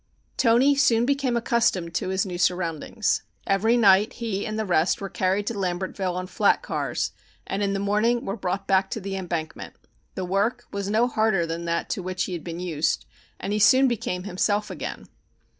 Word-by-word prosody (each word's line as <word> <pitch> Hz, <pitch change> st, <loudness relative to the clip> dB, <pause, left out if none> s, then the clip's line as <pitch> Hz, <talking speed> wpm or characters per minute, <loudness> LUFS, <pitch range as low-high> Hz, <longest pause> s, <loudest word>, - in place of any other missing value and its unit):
Toni 250 Hz, +4 st, +4 dB
soon 240 Hz, -4 st, +3 dB
became 270 Hz, -3 st, +1 dB
accustomed 225 Hz, -8 st, +1 dB
to -, -, -1 dB
his 190 Hz, +1 st, 0 dB
new 180 Hz, -2 st, -5 dB
surroundings. 180 Hz, +4 st, 0 dB, 0.2 s
Every 220 Hz, +5 st, +2 dB
night 205 Hz, -1 st, +5 dB
he 220 Hz, -5 st, -3 dB
and 215 Hz, 0 st, -3 dB
the 220 Hz, -, -1 dB
rest 175 Hz, -2 st, +2 dB
were 195 Hz, -, -5 dB
carried 190 Hz, +2 st, 0 dB
to 230 Hz, -, -2 dB
Lambertville 185 Hz, -1 st, -2 dB
on 185 Hz, 0 st, -3 dB
flat -, -, +2 dB
cars -, -, -2 dB, 0.3 s
and 200 Hz, -, -3 dB
in 200 Hz, -1 st, +1 dB
the 195 Hz, -, -1 dB
mornings 215 Hz, +4 st, +1 dB
were 195 Hz, -, -3 dB
brought 195 Hz, -1 st, -3 dB
back 190 Hz, 0 st, +2 dB
to -, -, -3 dB
the 195 Hz, -1 st, -5 dB
embankment. 170 Hz, -4 st, -5 dB, 0.4 s
The 185 Hz, -, -3 dB
work 205 Hz, +7 st, 0 dB
was 200 Hz, 0 st, -3 dB
no 225 Hz, +4 st, +3 dB
harder 215 Hz, -7 st, +1 dB
than 165 Hz, +1 st, -4 dB
that 170 Hz, 0 st, -1 dB
to -, -, -2 dB
which 185 Hz, 0 st, -2 dB
he 185 Hz, -, -4 dB
had 170 Hz, -, -5 dB
been 170 Hz, 0 st, -6 dB
used, 165 Hz, -4 st, -1 dB, 0.3 s
and 200 Hz, -, -3 dB
he 210 Hz, -, 0 dB
soon 260 Hz, +5 st, +6 dB
became 190 Hz, -6 st, -2 dB
himself 205 Hz, +2 st, 0 dB
again. -, -, -6 dB
195 Hz, 190 wpm, -25 LUFS, 180-225 Hz, 0.4 s, soon